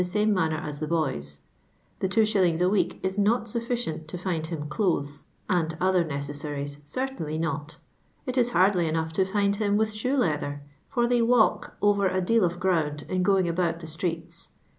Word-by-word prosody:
ime 210 0 +3
manner 160 -4 +1
as 150 -2 -5
the 155 - -3
boys. 75 - -2 0.6
The 190 - +1
2.<. 195 +4 +3
H 215 0 0
n 175 -4 +3
cek 185 +4 +1
is 190 +2 -1
not 220 +3 +2
sufficient 235 -8 -3
to 170 - -6
fmd 170 -3 -2
\\\m 150 -3 -4
dol\ies 150 -4 -1 0.2
«;i\di 165 -3 0
other 185 -1 +3
necessaries, 145 -1 -4
certainly 210 - -3
not; 160 -2 -3 0.5
it 255 -2 -3
it 245 -2 +3
hardly 185 -5 +3
enough 160 0 -1
to 190 +4 +2
find 200 +1 +1
him 205 -1 +1
with 220 0 +1
shoe 250 +6 0
leather, 145 - -1 0.2
for 240 -3 +1
they 245 0 +2
w<ilk 235 -1 +3
over 205 -1 +4
a 185 0 0
deal 225 +4 +3
of 175 0 0
ground 160 -6 0
in 185 0 0
going 190 -1 +3
al»out 170 -1 0
the 170 - -9
streets. 165 +1 -4
180 Hz, 185 wpm, -26 LUFS, 155-205 Hz, 0.6 s, over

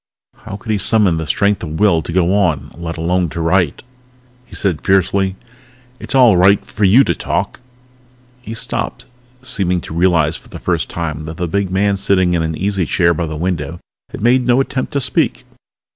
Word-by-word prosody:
How 100 - -9
could 110 +2 -6
he 105 - 0
summon 100 -4 +3
the 80 -1 -4
strength 100 +4 +1
of 80 -2 -5
will 100 -6 +3
to 85 - -7
go 90 +1 +2
on, 85 -8 0
let 85 0 -6
alone 85 +1 0
to 85 - -6
write? 85 -1 +1 0.6
He - - -12
said 90 -6 -1
fiercely, 95 0 +1 0.6
"It's - - -4
all 125 -6 +6
right 95 +3 +4
for 105 - -1
you 115 +8 +6
to - - 0
talk - - -3 0.4
" 125 0 -33
He 115 -2 -7
stopped, - - -3 0.4
seeming 95 -8 0
to - - -9
realize 85 -3 +2
for - - -18
the - - -8
first - - -2
time 80 -2 -4
that 80 +1 -7
the 90 - -2
big 100 +3 -1
man 100 +2 +1
sitting 95 -2 +2
in 85 - +1
an 80 -1 -2
easy 95 -3 -1
chair 85 -2 +2
by 85 +1 -3
the 80 0 -5
window 85 -1 -3 0.3
had - - -8
made 125 +2 +4
no 125 +1 +4
attempt 135 -1 -2
to 140 - 0
speak. 130 - -1
95 Hz, 200 wpm, -17 LUFS, 85-105 Hz, 0.6 s, all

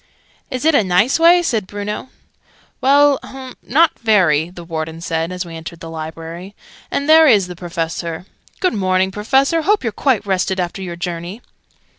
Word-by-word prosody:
"Is 255 +1 -4
it 320 - +4
a 255 - +4
nice 195 - +2
way?" 345 +2 +6
said 225 - -1
Bruno. 205 +4 -5 0.7
"Well, 285 +1 +4
hum, 260 -1 -10
not 320 +5 +2
very," 175 -8 +3
the 175 -1 -11
Warden 160 -1 -5
said, 165 0 -2
as 180 0 -4
we 165 -1 -9
entered 165 +1 -8
the 165 -1 -9
Library. 165 +4 -8 0.3
"And 280 - -2
here 320 0 +7
is 205 -8 +5
the 180 0 -8
Professor. 170 -1 -4 0.3
Good 370 - +1
morning, 190 -2 +1
Professor! 270 +10 +1
Hope 410 +2 +1
you're 230 - -1
quite 245 -3 0
rested 190 -1 0
after 180 +2 -3
your 175 -2 -5
journey!" 175 +5 -6
190 Hz, 170 wpm, -18 LUFS, 170-265 Hz, 0.7 s, here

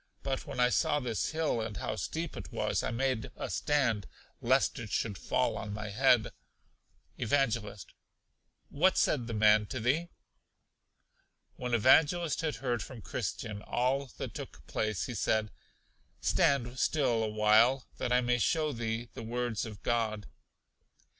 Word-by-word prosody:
But 135 -1 -3
when - - -6
I 125 0 +5
saw 145 +3 +2
this 120 -5 -2
hill, 155 -7 0
and 110 -2 -5
how - - -3
steep 165 +1 -4
it - - -8
was, - - 0
I - - -2
made 125 0 -1
a - - -5
stand, 125 -9 +1 0.3
lest 130 +2 +2
it 115 -2 -6
should 105 0 -1
fall 125 +6 0
on 105 -1 -5
my 105 0 -5
head. 125 0 +3 0.9
Evangelist. 115 -5 -1 0.8
What 180 +6 +3
said 125 -6 +2
the 115 - -4
man 105 0 +5
to 130 - -4
thee? 145 +9 +1 1.5
When 125 -1 -1
Evangelist 155 +8 +4
had 155 -4 -1
heard 120 -1 -2
from 115 -3 -9
Christian 105 +3 -4
all 130 +5 0
that - - -5
took - - -9
place, 110 -4 -2
he 125 - -5
said: 110 0 0 0.7
Stand 130 -2 +1
still 130 -7 +2
a 110 - -1
while, 110 +5 +4
that 120 - -2
I 125 0 +4
may 125 0 +1
show 155 +4 +1
thee 115 -1 -3
the - - -7
words 115 -1 -2
of 105 -2 -10
God. 110 -3 0
120 Hz, 155 wpm, -31 LUFS, 110-135 Hz, 1.5 s, I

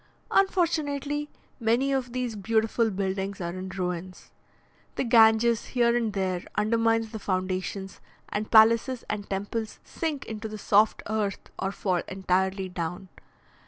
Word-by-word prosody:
Unfortunately, 295 -6 +1 0.3
many 240 +4 +2
of 260 -3 -1
these 250 -2 -2
beautiful 225 +2 +1
buildings 195 0 -2
are 170 -1 -3
in 185 +1 -6
ruins. 180 -1 -5 0.6
The - - 0
Ganges 230 -1 +5
here 240 -2 +2
and 230 -3 0
there 185 -2 -1
undermines 225 +1 +1
the 220 - -5
foundations, 185 0 -3 0.3
and 210 +1 -3
palaces 230 +3 +5
and 205 -1 -4
temples 205 +3 -3
sink 310 -4 -4
into 220 0 -5
the 215 0 -7
soft 210 +1 +3
earth 215 -3 -2
or 190 - -1
fall 185 -3 -1
entirely 190 0 0
down. 180 +1 -5
215 Hz, 130 wpm, -27 LUFS, 190-235 Hz, 0.6 s, Ganges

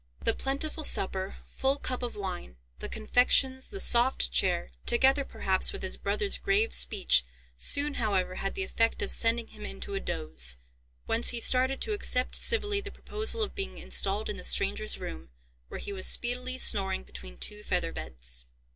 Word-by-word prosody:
The - - +2
plentiful 295 +4 -3
supper, 190 -5 +2
full 270 +1 -1
cup 255 -3 -4
of 245 -1 -5
wine, 185 - -6 0.2
the - - -6
confections, 260 +4 +2
the 395 - -7
soft 240 - +2
chair, - - +1 0.2
together 270 +3 +4
perhaps 190 -7 0
with 400 - -8
his - - -2
brother's 405 -2 -1
grave 420 +3 +1
speech, 190 - +4 0.3
soon, 285 - +5
however, 195 -7 -1
had 195 - -4
the 190 - -1
effect 225 +4 0
of - - -2
sending 230 0 +1
him - - -13
into 65 -1 -7
a - - -2
doze, 60 -2 +2 0.5
whence 230 +1 +3
he 240 - 0
started 260 +3 +2
to 440 - -1
accept 255 -11 -1
civilly 415 -3 +2
the 405 - -8
proposal 435 +2 0
of 415 - -4
being 390 -1 -5
installed 200 +2 0
in - - -5
the - - -9
stranger's 65 +2 -1
room, 65 0 -8 0.4
where - - -8
he 200 - -6
was 185 -1 0
speedily 250 +1 0
snoring 195 - +2
between 60 -1 -12
two 65 +1 -3
feather - - -2
beds. 60 -1 -7
230 Hz, 175 wpm, -28 LUFS, -, 0.5 s, soon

